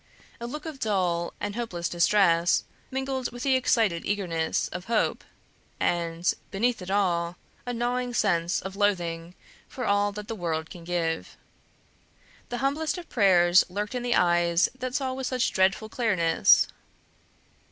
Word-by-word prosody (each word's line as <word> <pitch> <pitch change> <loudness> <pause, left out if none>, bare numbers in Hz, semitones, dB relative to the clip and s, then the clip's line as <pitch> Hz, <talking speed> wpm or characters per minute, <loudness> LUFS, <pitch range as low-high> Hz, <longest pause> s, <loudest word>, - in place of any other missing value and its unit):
A 235 - -5
look 300 +6 -7
of 310 -4 -7
dull 180 -6 0
and 205 0 -3
hopeless 195 -7 -3
distress, 175 -1 +3 0.3
mingled 265 -1 -3
with 245 0 -7
the 270 -1 +3
excited 225 -9 +2
eagerness 170 -6 -1
of 180 +1 -7
hope, 230 -2 0 0.6
and, 170 0 0 0.2
beneath 230 +2 0
it 180 - -7
all, 180 -3 0 0.3
a 245 - -2
gnawing 245 +1 -1
sense 175 -5 +1
of 190 +1 -6
loathing 175 -4 -1 0.3
for 250 - -5
all 205 0 +2
that 210 0 -7
the - - -4
world 160 -5 -3
can 175 - -10
give. 165 -2 -2 1.1
The 245 - -3
humblest 305 +5 0
of 350 - -9
prayers 185 -5 +5
lurked 205 +4 -4
in 250 - -2
the 240 0 +1
eyes 175 0 +3
that 255 0 -5
saw 265 -2 -1
with 260 0 -3
such 255 -2 0
dreadful 190 +3 +2
clearness. 205 -8 +3
200 Hz, 150 wpm, -26 LUFS, 175-245 Hz, 1.1 s, prayers